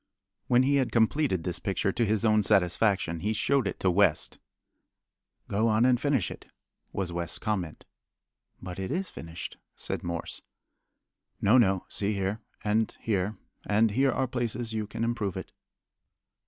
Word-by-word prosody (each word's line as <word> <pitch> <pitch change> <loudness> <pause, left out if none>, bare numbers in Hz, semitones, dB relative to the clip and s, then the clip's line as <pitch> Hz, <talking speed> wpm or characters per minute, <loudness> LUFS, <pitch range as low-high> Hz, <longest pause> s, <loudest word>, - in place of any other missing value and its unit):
When 125 +1 +5
he 140 +2 +3
had 130 -2 +1
completed 115 - +2
this 90 -1 -2
picture 100 -1 0
to 120 +3 +1
his 110 +1 +1
own 110 -1 +4
satisfaction, 95 -3 +2
he 105 +6 -1
showed 135 +1 +2
it - - -4
to 95 - +3
West. 90 -4 +2 1.1
"Go 110 +3 +1
on 110 +2 +3
and 125 -1 +3
finish 140 -10 +1
it," - - -10 0.4
was 95 -3 -2
West's 85 -1 -2
comment. 95 -8 -3 0.7
"But 90 0 -7
it 95 - -3
is 185 0 -2
finished," 80 +1 -8 0.2
said - - -4
Morse. 85 -1 -4 1.0
"No, 110 +6 +5
no. 95 -5 +2
See 105 +1 -1
here, 100 +3 -2 0.2
and 110 +1 0
here, 105 -1 -1 0.3
and 105 +1 +3
here 135 +5 +3
are 135 - 0
places 120 -2 -2
you 110 -1 -2
can 110 +2 -4
improve 115 -5 -1
it." - - -7
105 Hz, 155 wpm, -28 LUFS, 95-115 Hz, 1.1 s, When